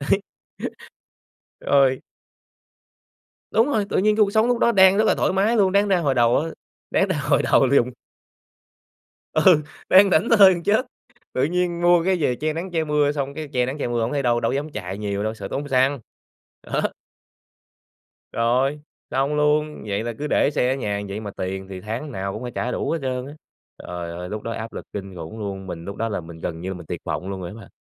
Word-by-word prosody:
đấy, 150 +8 +1 1.4
rồi. 135 -2 +3 1.5
Đúng 225 +2 +4
rồi, 220 -8 +1
tự - - 0
nhiên 210 +2 +3
cái 215 - +5
cuộc 200 - -1
sống 220 +2 +3
lúc 245 -1 +1
đó 235 - +4
đang 190 -2 +6
rất 215 - +4
là - - +3
thoải - - +1
mái 205 +5 +2
luôn, 195 -3 +4
đáng 200 +1 +3
ra 190 -2 +3
hồi 145 -5 +1
đầu 120 -1 +4
á 155 - -1 0.4
đáng - - +2
ra - - 0
hồi - - +4
đầu - - +4
là 135 +2 +2
dùng 125 -2 +4 1.4
Ừ, 175 -5 +5 0.3
đang 195 +1 +7
thảnh 180 +7 +3
thơi 195 -2 +8
gần 170 -1 -5
chết, 215 +8 +2 0.5
tự 130 - +1
nhiên 175 +2 0
mua 175 -1 +5
cái 190 +1 +2
về 145 -8 0
che 155 +4 -2
nắng 175 +4 -5
che 165 -2 0
mưa 150 -1 +2
xong 140 -1 -3
cái 155 +1 -6
che 125 -1 +2
nắng 130 +4 -4
che 145 - -2
mưa 120 -1 -1
hổng 115 - -1
thấy 140 -1 0
đâu, 120 -1 +2
đâu - - 0
có - - -1
dám 145 +3 -2
chạy 95 -4 -5
nhiều 100 -1 -2
đâu, 110 0 -1
sợ 100 -3 -7
tốn 145 +7 -4
xăng, 135 +1 +2 0.6
đó. - - -2 1.5
Rồi, 130 +5 +1 0.3
xong 140 +2 0
luôn, 150 -1 +1
vậy 100 +2 -1
là 120 0 -3
cứ 150 - -2
để - - +3
xe 125 -3 +1
ở - - -2
nhà 105 -6 -2
vậy 100 +2 -5
mà 105 -2 -6
tiền 95 +1 -4
thì 95 -1 -7
tháng 115 +9 -5
nào 95 -4 -4
cũng 110 - -6
phải 125 - -5
trả 125 - -1
đủ - - -2
hết 165 - -1
trơn 130 -1 -2
á. 145 - -9 0.4
Trời 85 -1 -6
ơi 90 +1 -6
lúc 105 +1 -4
đó 115 - -4
áp 110 0 -6
lực - - -7
kinh 95 -2 -6
khủng 85 +6 -8
luôn, 95 -2 -5
mình 85 -2 -7
lúc 100 - -6
đó 115 +1 -2
là 100 - -3
mình 80 0 -11
gần 80 0 -5
như 95 - -4
là - - -3
mình 85 - -10
tuyệt - - -5
vọng 95 - -4
luôn 95 -1 -5
rồi 85 - -5
á - - -9
bạn. 100 - -14
135 Hz, 235 wpm, -23 LUFS, 105-170 Hz, 1.5 s, thơi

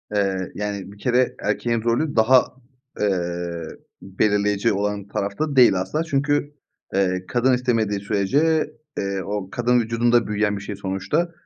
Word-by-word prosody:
Eee, 95 -2 0
yani 100 -1 -4
bir 100 - -14
kere 125 +3 +1
erkeğin 115 +2 -1
rolü 120 +6 0
daha, 120 +3 +5 0.5
eee, 85 -4 -2 0.3
belirleyeceği 105 +2 +1
olan 100 0 -2
tarafta 100 +9 -2
da - - -4
değil 125 -6 +7
asla 125 - -2
çünkü, 145 -1 0 0.4
eee, 95 -1 0
kadın 125 +2 +2
istemediği 115 -5 0
sürece, 140 +11 +1 0.3
eee, 100 -1 -2
o 100 -1 -4
kadın 120 +2 +2
vücudunda 115 +1 +2
büyüyen 105 -1 0
bir - - -7
şey 100 0 -6
sonuçta, 95 - -1
105 Hz, 140 wpm, -22 LUFS, 100-125 Hz, 0.5 s, değil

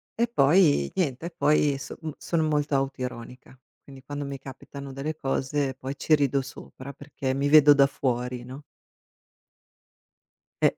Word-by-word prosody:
E 235 +1 +1
poi 150 - +3
niente 160 -3 -1
e - - -5
poi 150 -3 +2
so 135 - -8
m 160 - -4
sono 165 -2 -1
molto 150 -2 0
autoironica. 130 -2 -5 0.3
Quindi, 135 -1 -13
quando 145 +1 -5
mi 140 0 -5
capitano 135 +1 -10
delle 145 +4 -4
cose 135 -1 -1
poi 130 +1 -6
ci 155 - +3
rido 140 -2 +1
sopra 135 0 -10
perché 140 -1 -4
mi 140 +1 0
vedo 150 -1 +8
da 140 -1 +5
fuori, 125 -2 -3
no? 130 +4 -10 2.0
E - - +8
140 Hz, 150 wpm, -26 LUFS, 130-150 Hz, 2.0 s, vedo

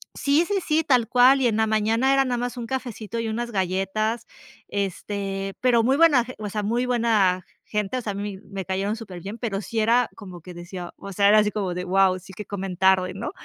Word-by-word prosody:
Sí, 285 +4 +2
sí, 410 - -1
sí, 315 +1 +2
tal 250 -6 +3
cual, 255 +4 +5
y 255 - +3
en 220 - +1
la 220 0 +2
mañana 220 +4 +2
era 270 0 +4
nada 245 -2 -1
más 245 +1 -3
un 235 -1 -5
cafecito 235 -3 -5
y 230 -1 -2
unas 235 +2 -3
galletas, 195 +4 -1 0.4
este, 195 0 -3
pero 240 -2 +4
muy 260 +4 +3
buena 290 -6 +5
ge 255 - -9
o 210 -1 -5
sea, 210 +1 -3
muy 235 +4 0
buena 220 -7 +2 0.2
gente, 210 +2 -2
o - - -2
sea, 215 -3 -3
a - - -6
mí 200 -1 -4
me 195 -2 -6
cayeron 195 +4 -2
superbién, 200 0 -8
pero 215 -4 -3
sí 225 +2 -3
era 235 +3 +3
como 185 -5 -10
que 180 +3 -10
decía, 175 +1 -8
o 200 - -8
sea, 200 +2 +4
era 215 - +6
así 210 0 +2
como 195 -4 -2
de 180 +1 -4
guau, 185 0 +3
sí 190 +1 -14
que 210 +2 -7
comen 195 -2 -5
tarde, 185 0 +3
¿no? 195 - -5
210 Hz, 230 wpm, -24 LUFS, 195-240 Hz, 0.4 s, era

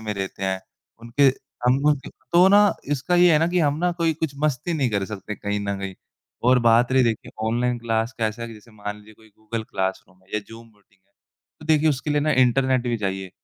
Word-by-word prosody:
में 110 -1 -3
रहते 95 0 -5
हैं, 95 0 -1 0.4
उनके 115 +4 -2 0.4
हम 125 +1 +5
उनके 145 -3 0 0.2
तो 175 +2 +7
ना 205 +1 +7 0.3
इसका 145 +6 -1
ये 175 -1 +6
है 155 - +5
ना 165 - +2
कि 180 - 0
हम 145 -2 +2
ना 180 +1 +1
कोई 165 -1 +2
कुछ 160 -1 -3
मस्ती 155 +3 0
नहीं 140 -5 +1
कर 100 -2 0
सकते 105 0 -6
कहीं 105 0 -3
न 100 0 -2
कहीं 95 -1 -5 0.5
और 130 - +6
बात 115 +2 +5
रही 130 - +5
देखिए 115 -2 -2 0.2
ऑनलाइन 120 +2 0
क्लास 115 +1 -1
कैसा 110 +1 -2
है? 115 - -5
जैसे 110 +2 -16
कि 110 - -20
मान 105 0 -5
लीजिए 105 +1 -16
कोई 110 +1 -21
गूगल 110 +2 -6
क्लासरूम 95 -2 -4
है 95 - -29
या 105 - 0
ज़ूम 115 +1 -12
मीटिंग 105 -2 -28
है, 100 - -43 0.5
तो 155 - -11
देखिए 155 0 +3
उसके 150 +1 -1
लिए 145 0 +2
ना 155 +1 +1
इंटरनेट 130 0 +3
भी 120 - 0
चाहिए 95 -2 -3
115 Hz, 230 wpm, -23 LUFS, 105-145 Hz, 0.5 s, तो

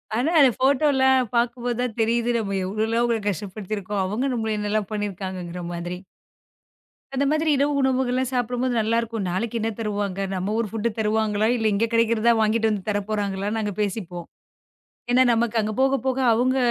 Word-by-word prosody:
ஆனா, 255 +7 +1
அ - - +7
அந்த 270 -3 +7
ஃபோட்டோல்லா 265 0 +3 0.3
பாக்கும் 240 +1 0
போது 240 -1 -1
தான் 245 -3 -2
தெரியுது 235 +1 +1
நம்ம 195 -3 -2
எவ்ளோலாம் 220 +4 0
அவங்கள 235 -2 +1
கஷ்டப்படுத்திருக்கோம். 200 +1 -4
அவங்க 225 +8 -1
நம்மள 220 -2 -1
என்ன 210 0 -2
எல்லாம் 215 -2 -1
பண்ணிருக்காங்கங்குற 185 -4 -4
மாதிரி. 175 +1 -4 1.2
அந்த 280 - +1
மாதிரி 310 +1 +1
இரவு 285 +1 +2
உணவுகள்லாம் 260 -1 +1
சாப்பிடும் 245 0 -1
போது 255 -1 0
நல்லா 225 +2 +1
இருக்கும். 225 -4 -4
நாளைக்கு 225 +6 -2
என்ன 225 - 0
தருவாங்க? 205 -3 -2 0.2
நம்ம 190 +3 -2
ஊர் 230 -3 -1
ஃபுட்டு 225 +1 -1
தருவாங்களா? 215 0 +1
இல்ல 220 -1 +1
இங்க 220 +3 +2
கிடைக்குறதா 230 0 +3
வாங்கிட்டு 220 +1 +2
வந்து 205 -1 -4
தரப்போறாங்களான்னு 205 0 -2
நாங்க 210 -2 -2
பேசிப்போம். 185 -4 -4 0.8
ஏன்னா 255 +1 +5
நமக்கு 230 0 0
அங்க 215 +1 -2
போகப்போக 265 -1 +1
அவங்க 255 +3 +2
220 Hz, 165 wpm, -23 LUFS, 205-245 Hz, 1.2 s, அ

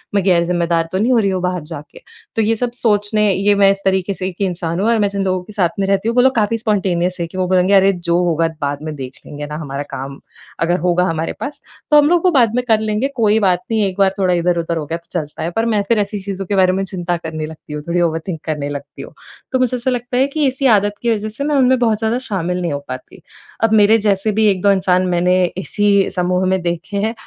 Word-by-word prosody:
मैं 200 - +2
गैर-ज़िम्मेदार 170 -2 +1
तो 185 - -1
नहीं 225 +6 +1
हो - - +4
रही 200 -3 +1
हूँ 185 -1 -2
बाहर 180 -1 -1
जाके। 150 -2 -10 0.3
तो 225 - +2
ये 225 +2 +2
सब 245 +2 -2
सोचने 210 -1 +2
ये 200 +2 +2
मैं 195 - +7
इस 195 - -2
तरीके 190 0 +1
से 185 - -3
एक 185 +1 -8
इंसान 175 -3 -2
हूँ 205 - +1
और 235 - +3
मैं 205 - +3
जिन 200 0 -2
लोगों 185 -1 0
के 210 - -13
साथ 185 -4 +1
में 195 - 0
रहती 195 +2 +1
हूँ, 235 - -2
वो 250 - +5
लोग 265 0 +3
काफ़ी 225 0 +1
स्पॉन्टेनियस 185 -5 0
हैं 170 - -2
कि 185 - -9
वो 185 -1 0
बोलेंगे 185 +1 +2
"अरे, 195 0 +5
जो 170 -1 -1
होगा 165 -1 +1
बाद 140 0 -2
में 155 0 -4
देख 130 -2 -8
लेंगे 145 0 -7
ना। 150 - -6
हमारा 140 -1 -4
काम 135 +1 -6 0.4
अगर 175 +2 +1
होगा 180 +1 +2
हमारे 165 -2 -2
पास 290 - -6 0.3
तो 300 - +7
हम 295 0 +5
लोग 350 +1 +2
वो 365 - +5
बाद 235 -7 +3
में 250 - +1
कर 220 -2 +4
लेंगे, 215 +4 -1
कोई 220 -3 +3
बात 180 -1 +1
नहीं। 220 -1 +2
एक 190 0 -6
बार 195 -1 +3
थोड़ा 185 -2 +2
इधर-उधर 170 -1 0
हो 155 - -3
गया 165 +3 -3
तो 170 +1 -5
चलता 150 -1 -7
है।" 165 - -1
पर 225 - +2
मैं 210 - +2
फिर 230 -2 +2
ऐसी 205 0 -2
चीज़ों 195 -1 -4
के 200 - -2
बारे 185 -1 +4
में 195 +1 -1
चिंता 175 -2 -3
करने 160 -2 -5
लगती 155 -1 -10
हूँ, 150 - -4
थोड़ी 175 +1 +1
ओवरथिंक 165 0 -2
करने 150 -2 -3
लगती 145 0 -7
हूँ। - - -10 0.4
तो 260 - +1
मुझे 255 -1 +1
ऐसा 245 +2 -1
लगता 245 0 -3
है 265 +2 +3
कि 295 -2 +3
इसी 265 +1 -2
आदत 205 +1 -1
की 235 -1 +2
वजह 215 +1 -4
से 220 +6 -6
मैं 295 0 0
उनमें 260 -1 +4
बहुत 225 -3 +2
ज़्यादा 220 +1 0
शामिल 180 -2 -2
नहीं 170 -4 -2
हो 140 - -2
पाती। - - -8 0.4
अब 225 -1 +3
मेरे 215 +1 +5
जैसे 200 +1 +1
भी 215 +1 +2
1-2 195 +1 +2
इंसान 185 -1 +2
मैंने 180 0 +2 0.2
इसी 200 0 +1
समूह 180 0 0
में 190 0 +1
देखे 175 +3 -3
हैं, 215 +3 0
190 Hz, 265 wpm, -18 LUFS, 170-215 Hz, 0.4 s, मैं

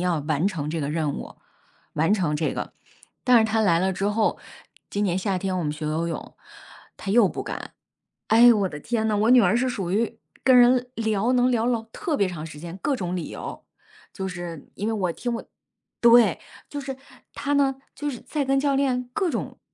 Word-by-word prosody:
要 175 -3 +1
完 155 +4 0
成 155 -7 -4
这 160 0 -2
个 140 - -2
任 155 -2 -1
务 - - -8 0.6
完 160 +6 +2
成 175 -8 +1
这 155 - -1
个。 - - -5 0.5
但 250 -1 +6
是 220 - +4
她 220 0 +1
来 175 -6 +3
了 190 +2 +1
之 195 +2 -2
后， 215 +1 +1 0.5
今 205 - -1
年 180 -2 +1
夏 190 -1 -1
天 185 0 -2
我 175 - -2
们 150 - -1
学 155 0 -5
游 160 +2 -1
泳， 165 - -6 0.6
她 195 - -5
又 225 0 +6
不 - - -5
敢。 - - -6 0.6
哎， 235 +2 +7
我 200 -3 +1
的 150 - -7
天 225 -2 -1
呐， 215 - +1
我 220 +3 +2
女 250 -2 +8
儿 220 - +3
是 255 +2 +1
属 195 -8 -3
于 225 +2 0 0.3
跟 260 -1 +6
人 245 0 +5
聊 220 +1 0
能 250 0 +3
聊 235 -1 +1
老 235 -2 0
特 330 -8 -2
别 200 - +2
长 160 -4 -6
时 155 -2 -10
间 170 +3 -8
各 285 - +1
种 180 -3 -3
理 170 - -4
由， - - -7 0.5
就 190 0 -4
是 175 -4 -7
因 205 - -3
为 225 - 0
我 185 -5 0
听 240 +6 -3
我 230 - -5 0.6
对， 235 0 +6 0.3
就 290 -1 -5
是 270 -1 -6 0.4
她 285 +1 -2
呢 275 -1 +3 0.2
就 295 - -3
是 250 -5 -6
在 295 -2 -2
跟 270 +1 +2
教 280 0 +1
练 255 -3 0
各 370 +1 0
种 - - -4
215 Hz, 235 characters per minute, -24 LUFS, 175-245 Hz, 0.6 s, 女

